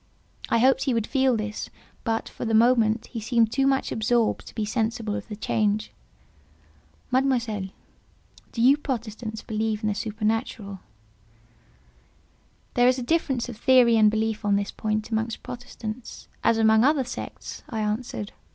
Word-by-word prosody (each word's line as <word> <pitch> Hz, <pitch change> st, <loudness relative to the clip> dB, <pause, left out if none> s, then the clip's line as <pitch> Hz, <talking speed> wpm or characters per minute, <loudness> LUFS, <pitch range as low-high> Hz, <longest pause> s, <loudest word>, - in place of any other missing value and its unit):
I -, -, +3 dB
hoped 260 Hz, +3 st, +4 dB
he 260 Hz, -4 st, +1 dB
would 225 Hz, -2 st, 0 dB
feel 265 Hz, -2 st, +2 dB
this, 210 Hz, 0 st, -4 dB, 0.3 s
but, 225 Hz, -2 st, -1 dB
for -, -, -8 dB
the 225 Hz, -1 st, +1 dB
moment, 225 Hz, -1 st, +4 dB
he 235 Hz, -, -6 dB
seemed 230 Hz, 0 st, +2 dB
too 270 Hz, +2 st, +2 dB
much 270 Hz, -1 st, +1 dB
absorbed 225 Hz, +1 st, +1 dB
to -, -, -12 dB
be 220 Hz, -, -1 dB
sensible 220 Hz, -1 st, -1 dB
of -, -, -5 dB
the 215 Hz, -, -6 dB
change. 215 Hz, 0 st, 0 dB, 1.2 s
"Mademoiselle, 240 Hz, -7 st, +1 dB, 0.8 s
do 230 Hz, -, -1 dB
you 270 Hz, +3 st, +6 dB
Protestants 225 Hz, -5 st, -5 dB
believe 220 Hz, -1 st, -2 dB
in 215 Hz, -, +1 dB
the -, -, 0 dB
supernatural?" 215 Hz, -1 st, -2 dB, 1.9 s
"There 245 Hz, 0 st, +4 dB
is 255 Hz, +1 st, +4 dB
a 250 Hz, -, -3 dB
difference 265 Hz, -4 st, 0 dB
of 240 Hz, -3 st, -8 dB
theory 245 Hz, -1 st, +5 dB
and 215 Hz, -1 st, +6 dB
belief 220 Hz, 0 st, -1 dB
on 205 Hz, -1 st, +2 dB
this 200 Hz, 0 st, -1 dB
point 215 Hz, 0 st, -2 dB
amongst 220 Hz, +1 st, -2 dB
Protestants 240 Hz, -1 st, -7 dB, 0.2 s
as 230 Hz, -, +4 dB
amongst 220 Hz, +2 st, +5 dB
other 295 Hz, -2 st, +2 dB
sects," 250 Hz, -, -7 dB
I 225 Hz, -3 st, -2 dB
answered. 210 Hz, -1 st, -3 dB
225 Hz, 155 wpm, -25 LUFS, 215-245 Hz, 1.9 s, you